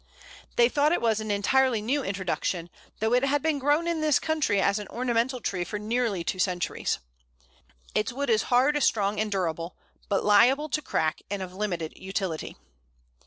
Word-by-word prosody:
They 235 - +6
thought 290 +4 +2
it - - +2
was 225 -2 +1
an 215 0 -5
entirely 235 +4 +2
new 265 +7 -1
introduction, 185 -3 -2 0.3
though 220 +2 +1
it 250 +1 +3
had 280 +1 +1
been 315 -3 +1
grown 295 +5 +2
in 335 -2 -1
this 305 -3 +4
country 305 -11 0
as 200 +2 +2
an 205 - -7
ornamental 245 +1 -1
tree 185 -6 -2
for 210 - -5
nearly 215 -3 -1
two 185 +2 -3
centuries! 180 -3 -1 1.0
Its 215 +4 0
wood 275 0 -1
is 220 -1 +4
hard, 270 +4 +3
strong, 205 -3 +1
and 215 -1 -1
durable, 170 -2 -2 0.3
but 200 - 0
liable 255 +9 +5
to 305 - -1
crack, 160 - -1
and 200 -1 -3
of 180 -1 -8
limited 180 -5 -3
utility. 190 -4 -4
220 Hz, 175 wpm, -27 LUFS, 195-265 Hz, 1.0 s, They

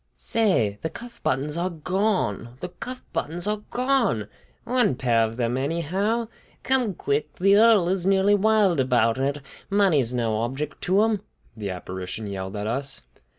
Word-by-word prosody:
"Say! 115 - +1
The 160 - -2
cuff 235 +8 -11
buttons 145 +3 -1
are 175 +2 0
gone, 170 - -1
the 180 - -5
cuff 255 +7 -8
buttons 170 +3 -2
are 210 0 -1
gone! 245 - +1 0.3
One 245 - +2
pair 120 -3 +1
of 115 +1 -1
them, 120 0 0
anyhow. 180 - -1 0.4
Come 250 -7 +2
quick! 145 0 -2
The 195 +2 +4
earl 215 -5 +6
is 185 0 0
nearly 195 +1 +3
wild 205 -5 +3
about 125 -2 +2
it. 140 +2 -1 0.3
Money's 180 - +3
no 115 -3 0
object 135 +6 -4
to 195 +4 +4
him!" 220 -3 +1 0.3
the 105 -3 -5
apparition 95 +3 -6
yelled 95 -1 -5
at 105 0 -3
us. 135 - -2
165 Hz, 155 wpm, -24 LUFS, -, 0.4 s, earl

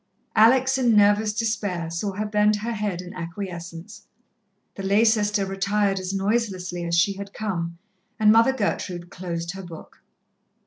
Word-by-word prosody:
Alex, 260 +4 +5
in 240 -3 +3
nervous 210 +1 +4
despair, 205 -6 -2
saw 185 +5 -2
her 210 +3 -3
bend 210 0 +2
her 220 +3 -3
head 205 -5 -3
in 180 - -10
acquiescence. 170 +1 -7 0.7
The - - -7
lay 200 +4 +3
sister 210 -2 +2
retired 195 +1 0
as 185 0 -4
noiselessly 195 -3 -1
as 170 0 0
she 195 +4 +3
had 200 0 -8
come, 170 -6 -3 0.4
and 215 -1 +6
Mother 230 +4 +5
Gertrude 185 -7 -3
closed 170 -2 -4
her 195 +1 -8
book. 170 -3 -12
200 Hz, 150 wpm, -24 LUFS, 180-215 Hz, 0.7 s, and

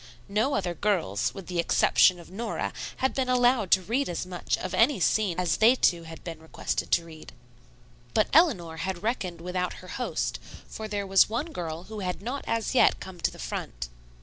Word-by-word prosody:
No 220 +8 +1
other 180 -3 -1
girls, 155 - 0
with 195 - -8
the 175 -1 -3
exception 175 +1 +4
of 170 - -13
Nora, 225 +5 -3 0.2
had 265 0 +1
been 260 -2 -1
allowed 245 -5 +3
to 190 +1 +4
read 240 +7 0
as 175 +1 -3
much 180 -1 -2
of 185 0 -5
any 230 +6 +4
scene 185 -1 +1
as 170 -4 +1
they 230 +4 +6
two 170 -9 +2
had 165 0 -10
been 165 -2 -7
requested 160 - -3
to 170 - +3
read. 160 -2 -12 0.8
But 215 - +4
Eleanor 195 - +4
had 185 +1 -4
reckoned 185 -7 -2
without 180 +1 -2
her 185 - -12
host, 250 - -2 0.3
for 220 - -6
there 205 -1 -3
was 195 +1 +5
one 280 +9 -2
girl 165 - -5
who 215 +2 -8
had 180 -4 -3
not 245 +8 -4
as 230 +2 -1
yet 260 - +4
come 185 -2 -9
to - - +2
the - - -13
front. - - -5
185 Hz, 200 wpm, -27 LUFS, 170-225 Hz, 0.8 s, they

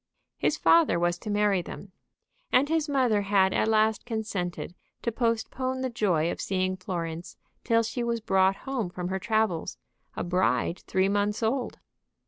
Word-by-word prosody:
His - - +1
father 330 - +4
was 175 0 0
to 215 - -7
marry 205 -2 +2
them. 190 +3 -9 0.6
And 270 +4 +4
his 320 -1 0
mother 250 -7 +2
had 195 -1 +3
at - - +1
last 220 -1 +2
consented 210 -7 -4 0.3
to 235 - 0
postpone 245 +3 -1
the 260 -1 -2
joy 180 -8 +1
of - - -5
seeing 185 -1 -1
Florence 170 -3 -5 0.3
till 230 -1 +3
she 235 +2 -3
was 235 0 -1
brought 190 -3 +2
home 260 -8 -2
from 180 0 -5
her 190 0 -2
travels, 215 -5 0 0.4
a - - -3
bride 180 0 +1
three 190 0 +2
months 205 +2 0
old. 245 +3 -1
210 Hz, 160 wpm, -27 LUFS, 185-235 Hz, 0.6 s, father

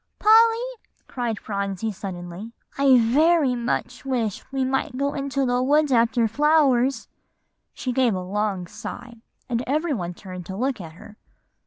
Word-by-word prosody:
"Polly," 460 +3 +4 0.3
cried 235 -4 -3
Phronsie 200 +1 -3
suddenly, 185 +2 -7 0.2
"I 275 -2 +5
very 280 +4 +3
much 245 +1 -3
wish 240 -7 -2
we 270 -1 0
might 260 -1 -1
go 280 +1 0
into 275 -1 -1
the 245 0 +1
woods 295 +2 +2
after 235 -1 +3
flowers;" 275 0 +2 0.6
she 255 - -4
gave 245 -4 +2
a 185 - -3
long 195 0 -2
sigh, 235 +7 -9 0.3
and 240 -1 -1
every 305 +4 0
one 175 -6 -4
turned 185 -2 -9
to 190 - -6
look 255 -2 -1
at 160 -2 -9
her. 210 +4 -14
245 Hz, 150 wpm, -23 LUFS, 210-275 Hz, 0.6 s, I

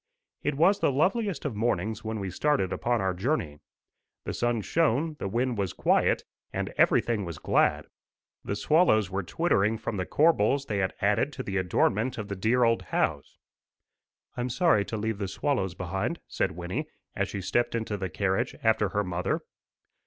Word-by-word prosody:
It 150 - -1
was 185 +6 +4
the - - +2
loveliest 185 - 0
of 135 -7 -2
mornings 110 -1 -1
when 110 0 -3
we 95 -2 -4
started 115 -4 +1
upon 120 -1 0
our 95 -1 0
journey. 90 - -2 0.6
The - - -4
sun 120 -2 0
shone, 155 +4 +1
the - - -2
wind 120 +2 -1
was 95 -3 -1
quiet, - - +2 0.3
and - - -3
everything 115 -4 +3
was 85 -4 -6
glad. - - +2 0.6
The 100 - -3
swallows 110 - +3
were 95 +1 -1
twittering 110 - +1
from 110 -1 -4
the 90 - -2
corbels 140 -4 +3
they 105 -6 -2
had 95 -1 -1
added 105 +8 +2
to 130 - -5
the 100 -3 -3
adornment 105 +6 +1
of 110 -1 -5
the 100 - -3
dear 115 +6 +2
old 115 -1 +3
house. 70 -3 -2 1.0
"I'm 125 +1 -2
sorry 145 - +3
to 110 - -4
leave 110 -1 -2
the 100 - -2
swallows 95 -3 -1
behind," 95 - -3
said - - -1
Wynnie, 85 +2 -4 0.3
as - - -1
she - - -4
stepped 120 +5 0
into 110 -2 -2
the 95 -2 -3
carriage 100 +7 -1
after 110 -3 +3
her 105 +1 0
mother. 90 -1 -1
110 Hz, 175 wpm, -28 LUFS, 95-130 Hz, 1.0 s, was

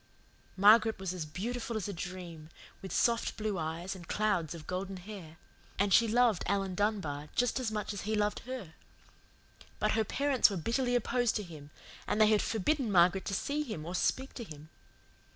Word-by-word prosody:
Margaret 215 +3 +6
was 190 -2 -3
as 170 -4 -5
beautiful 230 +7 -3
as 210 - -3
a 200 - -4
dream, 170 -3 -7 0.3
with 190 - -7
soft 235 -1 +1
blue 215 -4 -2
eyes 165 +4 -4
and 175 -3 -11
clouds 180 -7 0
of 155 -2 -10
golden 190 +1 -4
hair; 180 -4 -10 0.4
and 200 -1 +2
she 230 - +6
loved 230 -3 +3
Alan 195 -1 0
Dunbar 180 -8 -1
just 245 +1 +1
as 240 -4 -2
much 210 -1 -3
as 205 - -5
he 215 +1 -1
loved 210 0 0
her. 250 -11 -6 1.0
But - - +1
her 220 0 +2
parents 275 +3 +3
were 200 - -3
bitterly 245 +7 0
opposed 245 0 +1
to 210 - -1
him, 155 -5 -11 0.4
and 210 - 0
they 215 - +7
had 215 -1 +4
forbidden 235 +3 0
Margaret 180 +1 +4
to 195 - -1
see 285 +8 -1
him 215 - -5
or 175 - -5
speak 265 +8 0
to 240 - -6
him. 155 -5 -11
200 Hz, 190 wpm, -31 LUFS, 175-225 Hz, 1.0 s, they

